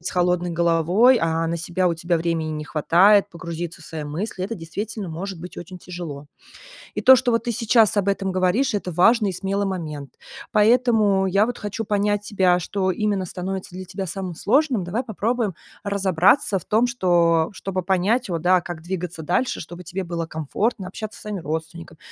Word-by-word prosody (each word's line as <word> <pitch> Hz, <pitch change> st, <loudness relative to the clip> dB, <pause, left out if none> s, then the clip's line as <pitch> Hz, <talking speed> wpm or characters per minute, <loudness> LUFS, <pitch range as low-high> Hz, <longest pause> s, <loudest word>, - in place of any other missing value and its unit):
с 175 Hz, -, -3 dB
холодной 180 Hz, 0 st, +1 dB
головой, 170 Hz, +9 st, +4 dB
а 165 Hz, 0 st, 0 dB
на 165 Hz, +1 st, -1 dB
себя 175 Hz, +2 st, -1 dB
у 170 Hz, -, +2 dB
тебя 170 Hz, +1 st, 0 dB
времени 165 Hz, -1 st, -1 dB
не 150 Hz, -1 st, -4 dB
хватает 195 Hz, +7 st, +4 dB
погрузиться 170 Hz, 0 st, -6 dB
в -, -, -13 dB
свои 160 Hz, -1 st, -6 dB
мысли- 180 Hz, +6 st, -4 dB
э -, -, -5 dB
то 230 Hz, -, -3 dB
действительно 200 Hz, +5 st, -5 dB
может 180 Hz, +3 st, -6 dB
быть 180 Hz, +1 st, -9 dB
очень 180 Hz, +1 st, -8 dB
тяжело. 170 Hz, -6 st, -8 dB, 0.7 s
И -, -, -2 dB
то, 260 Hz, -, +8 dB
что 250 Hz, -, -3 dB
ты 240 Hz, -, -8 dB
вот 235 Hz, -, -3 dB
сейчас 230 Hz, -2 st, +3 dB
об 200 Hz, -1 st, +1 dB
этом 195 Hz, -1 st, 0 dB
говоришь, 185 Hz, +8 st, +1 dB
это 195 Hz, -3 st, -2 dB
важный 210 Hz, +5 st, +4 dB
и -, -, -5 dB
смелый 195 Hz, +2 st, -2 dB
момент. 155 Hz, -7 st, -5 dB, 0.4 s
Поэтому 215 Hz, -3 st, +3 dB
я 195 Hz, +3 st, +3 dB
вот 245 Hz, -, -4 dB
хочу 210 Hz, +2 st, -4 dB
понять 205 Hz, 0 st, +1 dB
тебя, 190 Hz, -4 st, +2 dB
что 190 Hz, +2 st, -1 dB
именно 205 Hz, 0 st, -1 dB
становится 185 Hz, +1 st, -5 dB
для 185 Hz, 0 st, -6 dB
тебя 190 Hz, +1 st, -5 dB
самым 185 Hz, 0 st, -5 dB
сложным. 250 Hz, -, +1 dB
Давай 210 Hz, +8 st, -2 dB
попробуем 225 Hz, -2 st, -1 dB, 0.3 s
разобраться 195 Hz, -, +2 dB
в 175 Hz, -, -13 dB
том, 225 Hz, +3 st, +2 dB
что 245 Hz, -, -3 dB
что 170 Hz, -2 st, +3 dB
чтобы 190 Hz, -1 st, -4 dB
понять 195 Hz, +7 st, +1 dB
вот, 165 Hz, -3 st, -3 dB
да, 180 Hz, +1 st, +4 dB
как 175 Hz, -2 st, -7 dB
двигаться 175 Hz, -1 st, -5 dB
дальше, 180 Hz, +11 st, 0 dB
чтобы 175 Hz, +2 st, -9 dB
тебе 185 Hz, +2 st, -5 dB
было 170 Hz, -1 st, -3 dB
комфортно 185 Hz, -, -2 dB
общаться 215 Hz, +3 st, -7 dB
со -, -, -13 dB
своими 210 Hz, -3 st, -5 dB
родственниками, 160 Hz, +2 st, -6 dB
185 Hz, 195 wpm, -22 LUFS, 170-205 Hz, 0.7 s, то